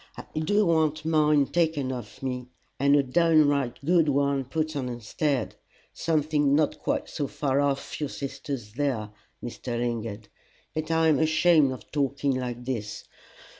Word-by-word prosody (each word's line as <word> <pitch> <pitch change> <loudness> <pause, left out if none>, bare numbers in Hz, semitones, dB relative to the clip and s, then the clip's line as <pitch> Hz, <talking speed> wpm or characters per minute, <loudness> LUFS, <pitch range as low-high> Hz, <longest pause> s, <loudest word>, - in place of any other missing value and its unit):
I - - -6
do 205 +7 +2
want 160 -3 +1
mine 150 -2 +4
taken 160 -5 0
off 120 -1 -8
me, 125 -1 -3 0.3
and 140 +1 +4
a 145 - +4
downright 145 -3 +3
good 170 -1 +4
new 145 - +2
one 140 -1 +1
put 155 +3 -2
on 130 -3 -2
instead 125 +2 -2 0.4
something 150 -3 +1
not 155 0 +1
quite - - -1
so 145 -3 -3
far 140 0 0
off 140 -1 -1
your 150 -2 -2
sister's 135 -6 -6
there, 120 -6 -1 0.3
Mr. 120 0 -5
Lingard. 115 -3 -3 0.5
But 155 0 -3
I'm 160 -2 +3
ashamed 160 -2 +4
of 130 - -9
talking 140 -1 0
like 125 -1 -4
this. 110 -5 -4
140 Hz, 150 wpm, -26 LUFS, 125-155 Hz, 0.5 s, mine